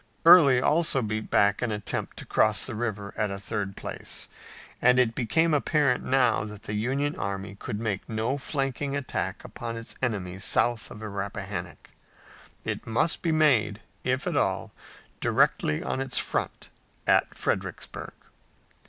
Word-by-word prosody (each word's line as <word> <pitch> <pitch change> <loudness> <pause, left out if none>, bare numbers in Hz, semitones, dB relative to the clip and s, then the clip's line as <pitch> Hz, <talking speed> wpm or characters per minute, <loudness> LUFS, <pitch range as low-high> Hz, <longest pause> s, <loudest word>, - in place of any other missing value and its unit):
Early 145 -7 +9
also 150 -1 +3
beat 110 0 -3
back 100 -1 +3
an 120 -2 0
attempt 105 -2 -3
to - - -7
cross - - +2
the - - -3
river 105 -3 -3
at 105 -1 0
a 100 0 -4
third 100 0 -4
place, - - -5 0.5
and 125 +1 +5
it 125 -3 +3
became 160 +8 +2
apparent 145 -3 +2
now 130 -5 +3
that 105 0 -9
the 105 - -5
Union 135 +7 0
army 100 0 -4
could 100 +1 -5
make 105 -4 -3
no 115 +5 -1
flanking 140 0 -2
attack 140 -2 -3
upon 115 -1 -6
its 115 - -7
enemy 95 -7 -2
south 115 +2 +1
of - - -9
the 110 - -5
Rappahannock. 100 -1 -5 0.7
It - - -4
must 120 +9 +1
be 165 - +1
made, 120 -10 +3 0.2
if 130 +1 0
at - - -1
all, - - 0 0.5
directly 75 - +2
on 130 - -2
its 135 -1 -1
front - - -2 0.4
at - - +3
Fredericksburg. - - -3
115 Hz, 155 wpm, -27 LUFS, 105-135 Hz, 0.7 s, Early